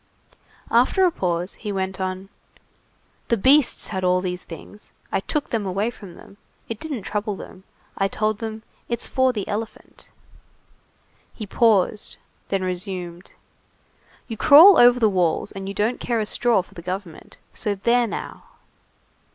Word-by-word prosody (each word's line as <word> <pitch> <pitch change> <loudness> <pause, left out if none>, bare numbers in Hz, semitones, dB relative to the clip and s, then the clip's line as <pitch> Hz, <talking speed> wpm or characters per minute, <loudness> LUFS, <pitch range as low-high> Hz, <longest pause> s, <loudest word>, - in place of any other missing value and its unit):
After 255 +11 +4
a 360 - +3
pause 180 - -2
he 210 - -6
went 190 -1 -3
on:— 185 +1 -4 1.0
"The 235 - +1
beasts 270 +6 +3
had 190 -2 -3
all 180 0 +3
these 180 -1 -4
things. 180 +5 -11 0.2
I 195 - +1
took 290 +9 -3
them 225 -3 -1
away 200 +4 -1
from 195 -6 -13
them. 200 - -16 0.3
It 225 -2 -6
didn't 285 -10 -5
trouble 210 0 -3
them. 190 0 -12 0.3
I 195 - +2
told 215 +1 -1
them: 220 -1 -6 0.3
'It's 235 -1 -1
for 260 0 +2
the 210 -5 -5
elephant.'" 220 +2 -7 1.3
He 215 - -6
paused, 210 -1 +1 0.3
and 195 -1 -1
then - - -3
resumed:— 180 -1 -5 0.9
"You 225 - -6
crawl 320 - +8
over 245 0 +6
the 225 - +4
walls 185 0 0
and 195 0 -7
you 195 - -5
don't 215 +5 0
care 235 -2 -1
a 215 - -1
straw 225 -2 +1
for - - -22
the 170 - -9
government. 180 -1 -7 0.2
So 205 -1 -2
there 235 +4 +2
now!" - - -7
205 Hz, 160 wpm, -22 LUFS, 185-235 Hz, 1.3 s, crawl